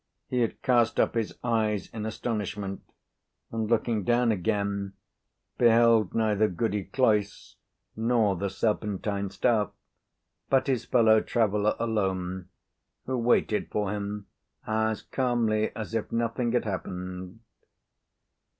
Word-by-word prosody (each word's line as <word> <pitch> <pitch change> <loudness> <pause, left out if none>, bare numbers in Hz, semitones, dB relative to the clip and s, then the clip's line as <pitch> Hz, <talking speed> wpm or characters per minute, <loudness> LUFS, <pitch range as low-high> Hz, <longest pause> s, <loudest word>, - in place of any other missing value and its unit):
He 125 - 0
had 115 -2 -1
cast 120 -2 +3
up - - +3
his 115 -2 -2
eyes 110 -4 0
in 110 -1 -4
astonishment, 105 -3 -3 0.7
and, 110 -1 -2
looking 115 -2 +1
down 120 +2 +3
again, 100 0 -1 0.7
beheld 115 -3 +5
neither 110 -1 +2
Goody 105 +1 -2
Cloyse 105 -3 0 0.4
nor 110 -3 +2
the 100 +3 -2
serpentine 100 -1 -1
staff, 105 +1 +1 0.8
but 135 -1 +3
his 130 -5 0
fellow 110 -3 +5
traveller 105 -2 +1
alone, 95 -5 -2 0.6
who 130 - -2
waited 115 -3 +1
for 105 -2 -1
him 105 0 -4 0.4
as 110 0 0
calmly 115 -4 0
as 110 0 -6
if 115 -2 -2
nothing 115 +1 0
had 125 - +1
happened. 90 0 -5
110 Hz, 115 wpm, -27 LUFS, 100-115 Hz, 0.8 s, beheld